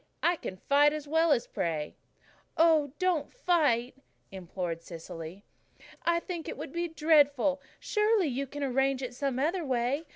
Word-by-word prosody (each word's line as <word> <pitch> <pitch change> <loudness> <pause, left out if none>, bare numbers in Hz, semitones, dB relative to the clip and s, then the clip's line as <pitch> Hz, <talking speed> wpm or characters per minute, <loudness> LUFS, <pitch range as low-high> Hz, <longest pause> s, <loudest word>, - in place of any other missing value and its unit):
I 345 - +4
can 185 - -7
fight 290 +7 +4
as 300 -1 -5
well 320 +2 +3
as 250 -5 +3
pray." 155 -3 -3 0.6
"Oh, 315 -4 +4
don't 365 -5 0
fight," 295 - +1 0.4
implored 180 -2 -5
Cecily. 165 +2 -9 0.6
"I 340 0 +2
think 340 -2 -6
it - - -6
would - - -7
be 345 0 -1
dreadful. 290 -4 +3 0.2
Surely 425 -2 +2
you 275 -1 -2
can 290 +2 -6
arrange 270 0 +1
it 250 -1 -5
some 270 0 -2
other 330 +6 0
way. 265 +3 -1
285 Hz, 155 wpm, -29 LUFS, 245-325 Hz, 0.6 s, I